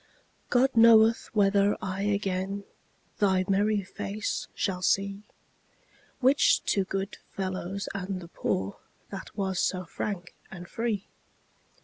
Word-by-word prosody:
God 260 +2 +4
knoweth 225 0 +6
whether 200 0 +3
I 190 +1 -3
again 200 -1 -1 0.6
Thy 190 -2 +3
merry 205 +1 +2
face 200 +2 -4
shall 190 -3 -1
see, 195 +2 +1 1.0
Which 265 +3 +4
to 195 -2 +1
good 195 +1 -3
fellows 190 0 -4
and 195 -1 -3
the 170 - -10
poor 95 - -2 0.3
That 195 +2 -8
was 190 -2 -1
so 185 -1 0
frank 180 +1 -5 0.2
and 175 -2 -9
free. 225 -1 -2
195 Hz, 115 wpm, -28 LUFS, 185-205 Hz, 1.0 s, knoweth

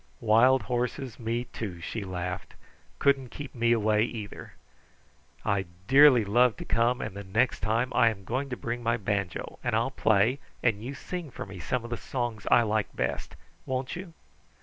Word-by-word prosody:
"Wild 115 +3 +5
horses 125 +2 -2
me, 115 +1 -1
too," 100 -7 -6
she 105 +5 -4
laughed, 90 -1 -5 0.4
"couldn't 135 -2 +2
keep 145 +1 -8
me 120 -2 +2
away 110 -2 +3
either! 110 -3 -6 0.9
I 100 -1 +1 0.2
dearly 135 -3 +7
love 120 +3 +3
to - - -7
come, 120 +2 +1
and 105 -3 -5
the 100 - -6
next 110 +6 +1
time 115 +4 0
I 115 - +5
am 100 -3 -6
going 130 +8 -2
to 125 - -4
bring 120 +1 -4
my 115 0 +1
banjo, 100 -4 -3
and - - 0
I'll - - +1
play, 110 +6 +3 0.2
and 110 -3 +1
you 135 +4 -5
sing 175 +1 -6
for - - -7
me 95 -2 -9
some 115 +9 -2
of 120 - -8
the 120 - -1
songs 120 -4 -4
I 120 - +6
like 110 -1 -1
best; - - -3 0.3
won't 130 +3 -2
you?" 180 -1 -8
115 Hz, 180 wpm, -28 LUFS, 105-125 Hz, 0.9 s, dearly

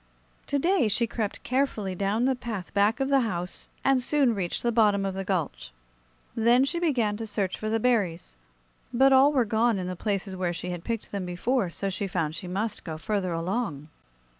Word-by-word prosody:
To 285 - 0
day 340 - +2
she 235 +3 +1
crept 220 -3 -4
carefully 255 -7 0
down 200 +5 0
the 265 - +3
path 230 -7 -6
back 205 +2 +3
of 270 0 0
the 275 -1 +5
house 180 -7 -3 0.2
and 270 -1 +4
soon 270 -2 +2
reached 185 -5 -3
the 240 - +2
bottom 210 -4 +3
of 195 - -2
the 195 0 -3
gulch. 170 - -2 0.6
Then 235 +3 +4
she 340 +5 -2
began 240 -11 +1
to 225 0 -5
search 200 -3 -1
for 215 - -4
the 225 +1 +1
berries; 200 - 0 0.6
but 270 +3 +5
all 270 +2 +6
were 260 -5 +2
gone 225 +1 +2
in 185 - -3
the 180 0 -4
places 195 0 -2
where 180 -2 -1
she 180 +1 -4
had 175 -1 -5
picked 230 -2 -4
them 195 -3 -3
before; 190 +4 0
so 195 +3 -3
she 195 +2 -2
found 165 -4 -1
she 165 +3 -7
must 205 +4 -3
go 160 -3 -5
further 195 +1 -1
along. 165 - -2
210 Hz, 205 wpm, -27 LUFS, 185-245 Hz, 0.6 s, all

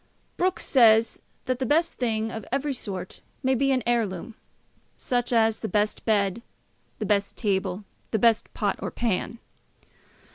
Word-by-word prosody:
Brooke 370 +1 0
says, 225 -3 +4 0.2
that 255 -1 -1
the 260 - 0
best 330 +5 +1
thing 225 -2 0
of 225 - -6
every 275 +2 0
sort 190 -7 -5 0.2
may 260 0 +3
be 275 +2 +2
an 255 -3 +1
heirloom, 230 -4 -1 0.6
such 245 -1 -1
as 225 -2 +3
the 220 - -3
best 210 0 0
bed, 205 -1 +1 0.6
the 215 - -3
best 200 0 0
table, 195 -2 -1 0.3
the 220 - 0
best 225 0 +2
pot 205 -3 0
or - - -3
pan. 230 0 -2
225 Hz, 150 wpm, -26 LUFS, 210-250 Hz, 0.6 s, says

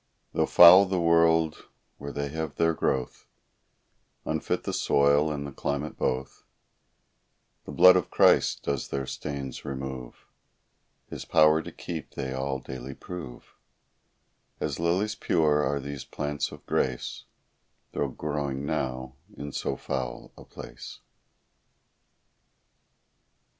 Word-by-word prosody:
Though - - +1
foul 90 +3 +9
the 95 -1 -1
world 85 -1 +3 0.3
where 70 0 -6
they 70 0 -3
have 80 +2 -4
their 85 0 +2
growth, 65 -5 -2 1.0
Unfit - - -2
the - - -3
soil, 70 +2 +3
and 70 -1 -4
the 70 - -6
climate 70 +2 -3
both, 65 +1 -3 1.2
The - - -7
blood 90 +1 +7
of 90 - 0
Christ - - +3
does 70 -2 -2
their 70 -1 -3
stains 70 -1 -6
remove; 65 -2 -7 0.8
His - - -7
power 75 +1 +4
to - - -9
keep 80 -4 -7
they 65 -1 -4
all 65 +1 -2
daily 65 0 -8
prove; 80 -9 -9 1.1
As 75 -1 -3
lilies 90 +6 +1
pure 75 -7 +2
are 70 +1 0
these 70 -1 -6
plants 75 +2 -3
of - - -12
grace, 65 -2 -2 0.7
Though 70 - -1
growing 70 -1 -3
now 65 -1 -3 0.2
in 70 0 -6
so - - -2
foul 65 -3 -5
a - - -13
place. - - -10
70 Hz, 120 wpm, -27 LUFS, 65-80 Hz, 1.2 s, foul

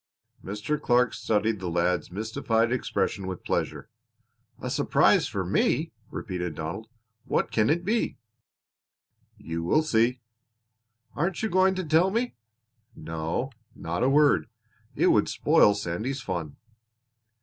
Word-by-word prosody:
Mr. 105 +10 -3
Clark 125 -2 +3
studied 110 0 0
the 90 -1 -4
lad's 85 -1 0
mystified 110 +3 0
expression 100 -6 -1
with 95 -1 -6
pleasure. - - -2 0.7
"A - - -5
surprise - - +3
for - - -3
me!" - - +1 0.2
repeated 90 -3 -4
Donald. 85 +8 -5 0.4
"What - - 0
can 110 +1 +2
it 170 +3 +1
be!" 225 +3 0 1.2
"You 80 0 -5
will 155 - +3
see." 120 -3 +2 0.9
"Aren't 175 +5 -2
you 220 - +1
going 190 +1 +4
to 185 - -2
tell 160 +4 +3
me?" 235 +5 -1 0.6
"No, 80 +11 -3 0.2
not 85 +2 -4
a 130 - +3
word. 140 - +4 0.5
It - - +4
would - - +3
spoil 105 - +4
Sandy's 105 +8 -3
fun." 85 - -4
110 Hz, 125 wpm, -27 LUFS, -, 1.2 s, going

